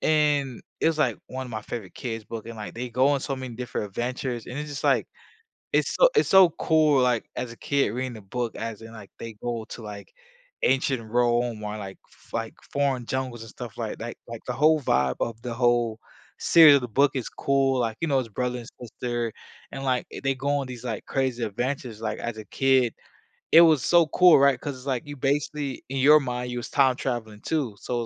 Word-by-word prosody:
And 145 -5 +1 0.2
it - - +2
was, 160 -1 +2
like, 150 - +1
one 130 0 -5
of - - -10
my 110 -1 -4
favorite 105 -3 -7
kids' 115 -3 -5
book, 115 0 -7
and, 115 -1 -8
like, 105 - -7
they 125 +1 -5
go 130 +4 +3
on 140 -1 +2
so 135 - -3
many 130 -3 -6
different 120 -4 -4
adventures, 120 +2 -3
and 125 - -7
it's 150 0 -5
just 145 - -6
like, - - +3 0.7
it's - - +2
so - - +8
it's 435 - +3
so 190 -2 +8
cool, 155 -5 +3
like, 125 -3 +1
as 120 - -4
a 115 - -12
kid 140 -6 +1
reading 125 +2 -3
the 110 - -10
book 120 +4 -4
as 115 -2 -5
in, 115 0 -11
like, 100 -4 -11
they 115 -1 -7
go 115 -2 -3
to, - - -7
like, 105 -2 -9 0.5
ancient 130 -2 +2
Rome 120 -2 +1
or, 105 0 -4
like, 95 -2 -8 0.3
f - - -24
like, - - -3 0.2
foreign 135 -4 0
jungles 130 -2 -3
and 115 - -9
stuff 120 -1 -9
like 115 -2 -4
that, 115 +1 -6
like 115 -1 -7
the 125 - -1
whole 155 +4 +4
vibe 65 - +1
of 115 -1 -3
the 120 0 -4
whole 120 -2 +1 0.4
series 160 -3 +8
of 140 - +2
the 125 - -4
book 135 +5 +3
is 130 -4 -3
cool, 135 -1 +1
like, 115 -2 -1
you 165 - 0
know, 135 -2 +2
it's 125 - -3
brother 125 +3 -2
and 115 - -10
sister, 120 -1 -3 0.4
and, 135 - -6
like, 130 -2 0
eh - - -7
they 135 0 +1
go 135 +2 -3
on 135 - -4
these, 125 -2 -8
like, 115 -4 -4
crazy 130 -3 -1
adventures, 120 +1 -3
like, 110 -1 -3
as 120 -2 -4
a 110 - -8
kid, 130 +1 +2 0.6
it 165 - +10
was 160 -5 +6
so 170 -2 +5
cool, 180 0 +6
right, 140 -2 +4
'cause 145 -2 -5
it's 130 +2 -13
like, 130 -3 -1
you 145 0 -7
basically 140 0 -1
in 135 - -2
your 150 +3 +7
mind, 125 -2 -3
you 125 - -3
was 120 - -6
time 135 -3 +3
traveling 110 -5 -4
too, 145 -9 -1
so, 125 - -4
it - - 0
125 Hz, 230 wpm, -25 LUFS, 115-135 Hz, 0.7 s, it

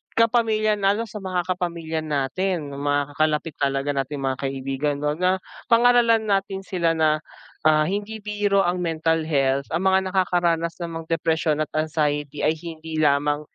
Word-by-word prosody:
kapamilya 220 -2 +3
lalo 200 +3 +2
sa 215 0 -8
mga 185 -1 -2
kapamilya 165 -3 -3
natin 150 +2 -2
mga 145 0 -1
kalapit 155 0 +1
talaga 140 0 0
nating 140 +1 -2
mga 130 -1 -1
kaibigan, 135 +2 -2
kumbaga, 180 +6 +1 0.3
pangaralan 235 -1 +5
natin 195 -1 0
sila 170 -3 +1
na, 155 -1 +2 0.5
ah, 155 -1 +5
hindi 205 +3 -3
biro 205 -1 +1
ang 180 0 0
mental 165 -1 0
health, 140 -2 +1
ang 170 +3 0
mga 190 0 +4
nakakaranas 170 -3 +1
ng 170 - -5
mga - - -13
depresyon 160 -2 0
at 155 - -10
anxiety 150 -2 -1
ay 155 - +3
hindi 160 -1 -6
lamang 145 0 +2
160 Hz, 150 wpm, -23 LUFS, 145-190 Hz, 0.5 s, pangaralan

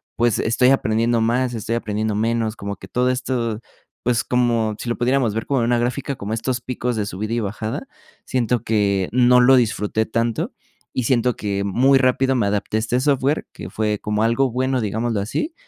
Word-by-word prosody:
pues, 120 -2 +1
estoy 120 +3 +3
aprendiendo 115 -2 +2
más, 120 +2 +1
estoy 115 0 -2
aprendiendo 110 -2 -2
menos, 115 0 0
como 100 -1 -6
que - - -12
todo 125 +1 +1
esto, 120 -4 -2 0.4
pues, 120 -2 +1
como 120 -3 +1
si 120 - -5
lo 120 - -1
pudiéramos 120 -3 +1
ver 115 - -2
como 140 -2 0
una 120 +1 +2
gráfica, 125 +3 -2
como 105 -2 -5
estos 120 +2 -1
picos 125 0 -3
de 105 -2 -1
subida 105 +3 -4
y - - 0
bajada, 110 - -4 0.4
siento 125 -2 0
que 100 -4 +1
no 125 0 +5
lo 130 +2 +6
disfruté 110 -2 0
tanto 115 0 -1 0.4
y 130 - -2
siento 125 0 +2
que 100 -1 -2
muy 130 +7 +3
rápido 130 +1 +2
me 115 -5 +1
adapté 105 +1 -1
a - - +2
este 120 +3 0
software, 140 +1 +1
que 85 - -8
fue 105 +1 -1
como 105 +1 -1
algo 125 +3 +2
bueno, 130 +1 0
digámoslo 110 +1 -1
así, 210 - -3
115 Hz, 190 wpm, -21 LUFS, 110-125 Hz, 0.4 s, lo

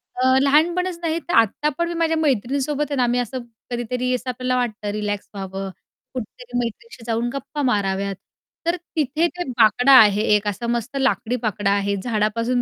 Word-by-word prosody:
अ, 255 - 0 0.2
लहानपणीच 340 +6 +2
नाही, 330 0 0
तर 345 - -6
आत्ता 230 +7 +3
पण 340 0 0
मी - - -3
माझ्या 325 -1 +1
मैत्रिणीसोबत 280 +1 0
आहे - - 0
ना, 250 -1 +3
मी 245 +1 +1
असं 245 +2 -3 0.3
कधीतरी 250 +1 -1
असं 250 +1 -5
आपल्याला 255 0 -1
वाटतं 215 -4 -2
रिलॅक्स 205 -1 -3
व्हावं, 195 0 -5 0.4
कुठेतरी 245 0 -6
मैत्रिणीशी 235 - -6
जाऊन 230 +1 0
गप्पा 290 +2 -5
माराव्यात. 200 -4 0 0.5
तर 340 - +3 0.2
तिथे 310 +2 +1
ते 355 - -1
बाकडा 245 +4 +5
आहे 210 -1 +4
एक 210 0 0
असा 220 +4 -2
मस्त 240 +3 -2
लाकडी 250 -2 +1
बाकडा 205 -2 0
आहे. 200 0 +1
झाडापासून 230 +2 0
245 Hz, 170 wpm, -22 LUFS, 210-280 Hz, 0.5 s, बाकडा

